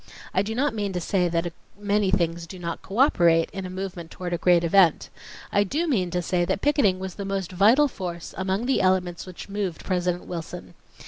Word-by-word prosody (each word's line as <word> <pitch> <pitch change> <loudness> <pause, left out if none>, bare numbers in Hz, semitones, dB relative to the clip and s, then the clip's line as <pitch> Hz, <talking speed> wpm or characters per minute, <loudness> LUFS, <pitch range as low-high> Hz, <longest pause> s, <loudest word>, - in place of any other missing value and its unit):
I 190 - +3
do 220 +3 -3
not 275 +1 +1
mean 205 -3 -2
to 180 - -1
say 180 0 +1
that 170 0 -1 0.2
many 205 -1 +1
things 170 -2 0
do 185 - -9
not 170 -2 -5
cooperate 175 - +3
in 195 -2 -5
a - - -8
movement 185 -3 -6
toward 175 0 -5
a 170 - -1
great 175 -1 +4
event. 170 -1 +3 0.4
I 205 - +3
do 300 - -1
mean 195 - +1
to 180 0 -2
say 175 0 +1
that 175 - -1
picketing 280 -11 +3
was 190 -1 -6
the 200 - -6
most 195 -2 -3
vital 220 +11 +5
force 175 -8 -6
amongst 190 +4 -1
the 265 - +2
elements 185 -2 0
which 185 - -9
moved 200 -4 -3
President 180 -1 -1
Wilson. 160 - -7
185 Hz, 205 wpm, -25 LUFS, 175-200 Hz, 0.4 s, vital